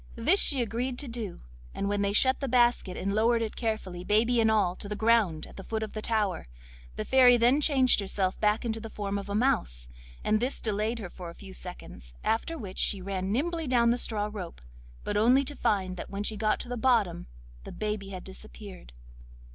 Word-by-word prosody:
This 320 +13 +3
she 270 -4 +2
agreed 245 +3 -3
to 285 - -5
do, 230 -6 -5 0.3
and 200 +1 -1
then 205 0 0
they 200 0 +1
shut 260 +5 +3
the 275 - -2
basket 240 -6 +2
and 195 +1 -2
lowered 230 +2 +3
it 220 - -4
carefully, 215 -6 -3
baby 230 +4 +3
and 220 - +4
all, 200 -5 +2
to 200 - -6
the 210 - -2
ground 220 -8 +2
at - - -14
the 195 - -7
foot 220 +1 -3
of 215 - -6
the 215 - -4
tower. 210 - -1 0.5
The - - -4
Fairy 250 -2 +6
then 245 +5 +4
changed 265 -6 +4
herself 190 -1 -1
back 210 +2 +1
into 225 -1 -2
the 225 0 -7
form 200 -1 -3
of 200 0 -8
a 200 - -2
mouse, - - 0 0.4
and 215 0 +2
this 250 +4 -1
delayed 215 +2 -1
her 195 -6 -7 0.2
a 170 - -11
few 195 -2 -11
seconds, 60 - -8
after 325 +9 0
which 195 -8 -6
she 200 - +1
ran 190 0 -3
nimbly 325 +6 -1
down 235 -2 +4
the 240 - +1
straw 210 -3 0
rope, 180 -5 -7 0.4
but 205 - -1
only 245 +6 +5
to 290 +2 -5
find 185 -6 -1
when 200 +1 -4
she 215 - -1
got 215 0 +1
to - - -7
the 245 0 -4
bottom 225 -8 +1 0.4
that - - -17
the - - -7
baby 210 -2 -3
had 185 -2 -7
disappeared. 190 - -10
215 Hz, 215 wpm, -28 LUFS, 195-240 Hz, 0.5 s, Fairy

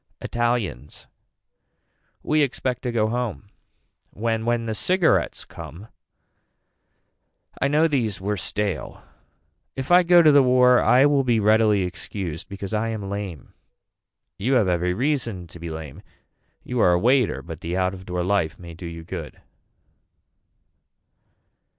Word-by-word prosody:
Italians. 120 - -3 1.2
We 155 0 +2
expect 130 -2 -1
to 125 - -3
go 110 -2 +1
home. 115 -4 -4 0.6
When 115 +1 -2
When 120 -1 0
the 110 - -2
cigarettes 180 - +1
come. 100 +7 -11 1.7
I - - +3
know 150 +3 +3
these 120 -10 -1
were 100 +2 -2
stale. 95 -6 -4 0.7
If 135 +4 -5
I 180 +1 +8
go 175 -1 +6
to 155 - +7
the 145 -1 +6
war 125 -1 +5
I 130 +3 +5
will 145 -2 +3
be 120 -3 +2
readily 105 -1 +3
excused 90 -2 -5
because 100 +1 -6
I 110 +1 0
am 105 -3 -4
lame. 100 -8 -6 0.9
You 125 +7 0
have 115 -7 +3
every 90 0 0
reason 120 -8 -1
to 85 +1 -13
be 85 0 -6
lame. 80 -4 -8 0.6
You 125 -1 -3
are 90 - +5
a 90 - +2
waiter 125 +2 +2
but 80 -1 -9
the 85 +2 -3
out 95 0 0
of 95 0 -11
door 90 -1 -2
life 95 -4 0
may 85 -2 -10
do 85 +1 -8
you 85 0 -8
good. 85 -3 -8
110 Hz, 145 wpm, -23 LUFS, 90-125 Hz, 1.7 s, I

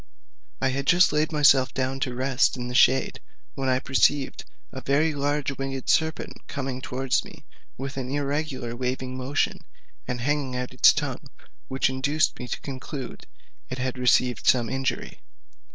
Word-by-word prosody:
I 135 - +1
had 135 +1 -3
just 180 -3 +5
laid 155 +1 +1
myself 140 -4 +4
down 130 +1 -1
to 125 -2 -2
rest 130 +1 +1
in 125 0 -4
a - - -5
shade, 130 +1 +4 0.3
when 135 -1 -2
I 130 - +3
perceived 135 +1 +1 0.3
a - - -7
very 150 +3 +2
large 145 0 -1
winged 135 -1 -4
serpent 160 -1 0
coming 130 -2 -4
towards 130 0 0
me, - - -14 0.3
with 135 +1 -5
an 130 -1 -3
irregular 140 -3 -2
waving 130 +1 -3
movement, 130 +2 -1 0.5
and 125 0 -3
hanging 140 0 -1
out 125 +1 -4
its 130 - +7
tongue, 145 -1 -4 0.4
which 130 0 +1
induced 140 +4 0
me 125 - -6
to - - -4
conclude 135 -1 -7 0.4
it 130 - -4
had 130 0 -3
received 125 -2 +2
some 120 -3 +4
injury. 135 -1 -3
135 Hz, 160 wpm, -25 LUFS, 130-140 Hz, 0.5 s, its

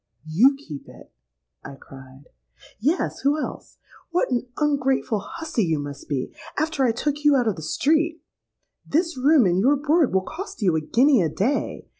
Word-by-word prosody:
'—'You 220 - +4
keep 155 - -10
it!' - - -15 0.5
I 140 - -9
cried.—'Yes; 135 - -6
who 285 +2 +1
else? - - -7 0.3
What 345 -5 0
an 245 0 -1
ungrateful 270 -6 0
hussy 320 -2 -3
you 165 -3 0
must 145 -1 -7
be, 135 -3 -3 0.2
after 310 -2 0
I 245 - +3
took 295 +5 -3
you 295 -1 +5
out 245 -3 +2
of 215 - +1
the 160 - -9
street! 315 - +1 0.6
This 335 +3 0
room 275 0 +4
and 180 0 +2
your 265 +8 +4
board 300 +1 +2
will 190 - +2
cost 345 - -7
you 180 -4 +3
a 160 - 0
guinea 250 - +3
a 165 - +1
day. 235 - -2
265 Hz, 170 wpm, -23 LUFS, 180-300 Hz, 0.6 s, you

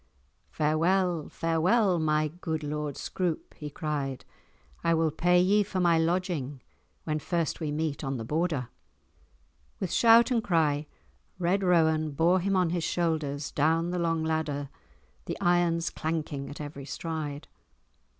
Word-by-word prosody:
Farewell, 165 +2 +1
farewell, 180 +4 +2
my 155 -1 +1
good 160 -1 -4
Lord 150 -1 -3
Scroope," 175 -4 -3
he 150 - -7
cried. 145 -3 -3 0.6
"I 170 0 +3
will 160 -1 +2
pay 175 +3 +3
ye 200 +4 +4
for 195 -2 -2
my 170 -2 +4
lodging 165 -6 -1 0.4
when 155 -1 -1
first 170 0 -1
we 155 -3 -2
meet 155 0 -2
on 135 -1 -2
the 115 - -5
Border." 150 -3 -1 1.1
With 185 - -3
shout 230 +1 +6
and 230 -3 +2
cry 155 -7 +1 0.5
Red 180 +2 +1
Rowan 160 -4 +2
bore 170 +5 +3
him 195 +2 0
on 180 -3 +2
his 175 -1 -1
shoulders 155 -5 -1
down 165 +3 +1
the 180 - -1
long 165 -1 0
ladder, 155 -3 -2 0.6
the - - -5
irons 175 -2 +2
clanking 155 -4 -3
at 145 - -9
every 145 -2 -7
stride. 155 -2 -5
160 Hz, 140 wpm, -28 LUFS, 150-175 Hz, 1.1 s, shout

